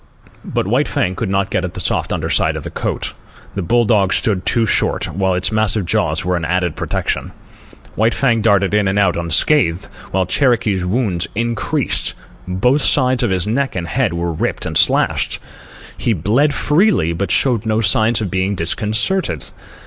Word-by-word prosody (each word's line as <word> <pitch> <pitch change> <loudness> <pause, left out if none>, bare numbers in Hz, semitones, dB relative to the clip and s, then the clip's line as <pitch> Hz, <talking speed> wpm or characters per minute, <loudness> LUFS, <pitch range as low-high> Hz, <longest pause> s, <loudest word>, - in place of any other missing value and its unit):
But - - -2
White - - +1
Fang 90 - -1
could - - -3
not 95 0 0
get 90 - 0
at 90 0 -5
the - - -5
soft 85 - -1
underside - - 0
of - - -5
the - - -5
throat. - - -3 0.4
The 100 - -3
bull 120 +7 +2
dog 100 -4 +2
stood 100 -7 0
too 115 -1 +2
short, - - 0
while 95 +1 0
its 90 +4 0
massive 110 -2 +1
jaws 85 - 0
were 90 0 0
an 85 - -3
added 90 0 -1
protection. - - -3 0.6
White 110 +2 +1
Fang 120 -5 +1
darted 100 -2 +2
in 105 -1 +2
and 95 +1 0
out 100 -4 +2
unscathed, 85 - +1 0.2
while 95 0 0
Cherokee's 105 - +1
wounds 95 -2 -1
increased. 115 0 -2 0.3
Both 125 +11 +1
sides 130 -2 +2
of 120 - +1
his 95 -1 0
neck 130 +6 -1
and 85 -2 -3
head 125 +4 0
were 85 0 -2
ripped 80 - -2
and - - -4
slashed. - - +2 0.6
He 115 - 0
bled 110 - +1
freely, 150 - +2
but 100 +4 -3
showed 115 -5 +2
no 110 0 +1
signs 110 +2 +3
of 100 - -3
being 95 +2 0
disconcerted. 105 - -1
100 Hz, 180 wpm, -17 LUFS, 90-115 Hz, 0.6 s, signs